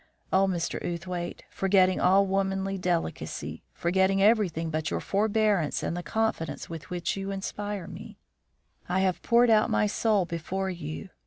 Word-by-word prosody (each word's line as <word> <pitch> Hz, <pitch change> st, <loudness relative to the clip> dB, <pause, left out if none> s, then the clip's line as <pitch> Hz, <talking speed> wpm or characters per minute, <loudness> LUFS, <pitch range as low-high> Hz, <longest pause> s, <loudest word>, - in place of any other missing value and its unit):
Oh, 195 Hz, +1 st, +5 dB
Mr. 175 Hz, -3 st, -2 dB
Outhwaite, 175 Hz, 0 st, -4 dB
forgetting 190 Hz, -1 st, +3 dB
all 195 Hz, +2 st, +5 dB
womanly 195 Hz, 0 st, 0 dB
delicacy, 175 Hz, -, -2 dB
forgetting 190 Hz, +2 st, +1 dB
everything 195 Hz, -6 st, +2 dB
but 155 Hz, 0 st, -1 dB
your -, -, -1 dB
forbearance 205 Hz, -5 st, +1 dB
and -, -, -2 dB
the 175 Hz, -, -3 dB
confidence 220 Hz, -4 st, -2 dB
with 165 Hz, +1 st, -8 dB
which 175 Hz, -2 st, -2 dB
you 195 Hz, 0 st, -4 dB
inspire 200 Hz, 0 st, -4 dB
me, -, -, -10 dB, 0.7 s
I 185 Hz, +1 st, +2 dB
have 185 Hz, -2 st, +1 dB
poured 235 Hz, 0 st, +4 dB
out 215 Hz, -1 st, +4 dB
my 105 Hz, 0 st, +2 dB
soul 205 Hz, -, +2 dB
before 185 Hz, +3 st, -3 dB
you. 170 Hz, +2 st, -6 dB
190 Hz, 150 wpm, -28 LUFS, 170-200 Hz, 0.7 s, Oh